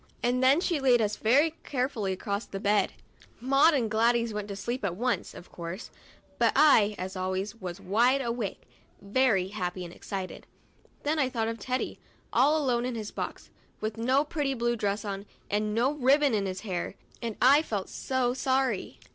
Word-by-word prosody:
And 245 Hz, +1 st, +1 dB
then 270 Hz, +4 st, +6 dB
she 340 Hz, -4 st, 0 dB
laid 255 Hz, -3 st, +4 dB
us 210 Hz, -1 st, 0 dB
very 280 Hz, +10 st, +3 dB
carefully 250 Hz, -7 st, -1 dB
across 200 Hz, +3 st, -3 dB
the 195 Hz, -, -6 dB
bed. 205 Hz, +1 st, +2 dB, 0.5 s
Maud 275 Hz, +6 st, +4 dB
and 245 Hz, -5 st, +1 dB
Gladys 230 Hz, +1 st, +2 dB
went 210 Hz, -1 st, -4 dB
to 200 Hz, -, -5 dB
sleep 240 Hz, +4 st, -4 dB
at 185 Hz, -3 st, -1 dB
once, 245 Hz, +4 st, -1 dB
of 175 Hz, -, -12 dB
course; 170 Hz, +4 st, -7 dB, 0.5 s
but -, -, +4 dB
I, 215 Hz, -9 st, +5 dB
as 185 Hz, +1 st, -5 dB
always, 190 Hz, +2 st, -2 dB
was 180 Hz, 0 st, -5 dB
wide 230 Hz, +8 st, +3 dB
awake, 235 Hz, -5 st, -3 dB, 0.4 s
very 200 Hz, -2 st, +2 dB
happy 180 Hz, -3 st, -4 dB
and 170 Hz, -, -10 dB
excited. 190 Hz, -1 st, -6 dB, 0.6 s
Then 305 Hz, +2 st, 0 dB
I 265 Hz, -3 st, +2 dB
thought 225 Hz, -3 st, -1 dB
of 230 Hz, 0 st, -5 dB
Teddy, 255 Hz, +5 st, -3 dB, 0.3 s
all 280 Hz, +6 st, +4 dB
alone 250 Hz, -5 st, +1 dB
in 250 Hz, -1 st, -3 dB
his 215 Hz, -2 st, -5 dB
box, -, -, -6 dB, 0.3 s
with 215 Hz, 0 st, -3 dB
no 255 Hz, +5 st, +2 dB
pretty 290 Hz, -3 st, -2 dB
blue 240 Hz, 0 st, 0 dB
dress 205 Hz, -1 st, -2 dB
on, 200 Hz, 0 st, -5 dB, 0.2 s
and 210 Hz, +1 st, 0 dB
no 245 Hz, +4 st, +3 dB
ribbon 285 Hz, -1 st, +3 dB
in 200 Hz, -2 st, +1 dB
his 185 Hz, 0 st, -4 dB
hair, 185 Hz, -3 st, -4 dB, 0.3 s
and 230 Hz, -3 st, -4 dB
I 275 Hz, +4 st, +6 dB
felt 205 Hz, -11 st, -3 dB
so 255 Hz, -2 st, -1 dB
sorry. 260 Hz, -4 st, 0 dB
230 Hz, 180 wpm, -28 LUFS, 200-260 Hz, 0.6 s, then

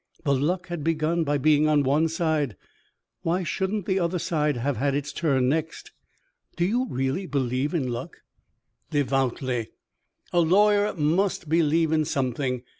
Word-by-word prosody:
The 140 Hz, -, +2 dB
luck 175 Hz, +7 st, -1 dB
had 175 Hz, -4 st, -4 dB
begun 165 Hz, +1 st, +1 dB
by 145 Hz, -1 st, 0 dB
being 150 Hz, +2 st, +3 dB
on 150 Hz, -2 st, +3 dB
one 145 Hz, +4 st, +2 dB
side 160 Hz, -, -1 dB, 0.7 s
why 175 Hz, +3 st, 0 dB
shouldn't 190 Hz, +3 st, -2 dB
the 190 Hz, 0 st, +1 dB
other 175 Hz, 0 st, 0 dB
side 150 Hz, -5 st, 0 dB
have 130 Hz, +1 st, -1 dB
had 140 Hz, +3 st, 0 dB
its 145 Hz, 0 st, -3 dB
turn 135 Hz, -6 st, +1 dB
next?" 160 Hz, +3 st, -2 dB, 0.6 s
"Do 175 Hz, -, +1 dB
you 245 Hz, +7 st, 0 dB
really 135 Hz, +9 st, -2 dB
believe 135 Hz, +2 st, -1 dB
in 140 Hz, -6 st, 0 dB
luck?" 120 Hz, -1 st, -5 dB, 0.7 s
"Devoutly. 130 Hz, -4 st, 0 dB, 0.7 s
A 175 Hz, -, +4 dB
lawyer 205 Hz, +5 st, +3 dB
must 170 Hz, +2 st, 0 dB
believe 160 Hz, 0 st, +2 dB
in 155 Hz, -1 st, +2 dB
something. 130 Hz, -2 st, -2 dB
155 Hz, 150 wpm, -25 LUFS, 135-170 Hz, 0.7 s, A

